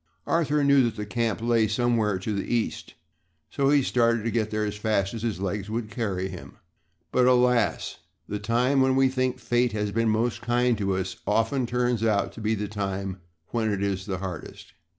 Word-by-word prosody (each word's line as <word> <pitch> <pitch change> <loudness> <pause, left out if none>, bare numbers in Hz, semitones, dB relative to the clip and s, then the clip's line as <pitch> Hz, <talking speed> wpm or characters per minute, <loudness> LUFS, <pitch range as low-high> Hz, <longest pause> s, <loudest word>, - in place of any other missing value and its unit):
Arthur 150 -3 +1
knew 140 -1 +5
that 115 -2 -2
the 105 -1 -4
camp 115 0 -1
lay 115 -2 +3
somewhere 110 -2 +1
to 100 +4 -3
the 100 - -3
East 120 -2 -2 0.6
so 140 -1 +1
he 145 -1 +4
started 115 -3 +2
to 115 - -1
get 110 -2 0
there 105 0 -1
as 105 0 -3
fast 105 -2 0
as 115 - -5
his 115 -5 -2
legs 100 +1 -3
would 110 0 -3
carry 100 -5 -2
him. 90 -2 -10 0.5
But, 125 0 +3
alas. 125 -3 +2 0.3
The 105 - -3
time 125 +5 +2
when 130 0 +3
we 135 0 +4
think 130 -1 -1
fate 120 -1 +1
has 105 -1 -1
been 115 +1 +1
most 110 +2 0
kind 120 +1 +2
to 100 -2 0
us 95 -2 -4
often 115 +4 +1
turns 120 -2 0
out 105 -3 +1
to - - -9
be 110 +1 +1
the 105 0 -3
time 95 -2 -4 0.3
when 110 -2 0
it 100 -1 -1
is 95 0 -2
hardest. 95 -3 -6
110 Hz, 195 wpm, -26 LUFS, 100-120 Hz, 0.6 s, knew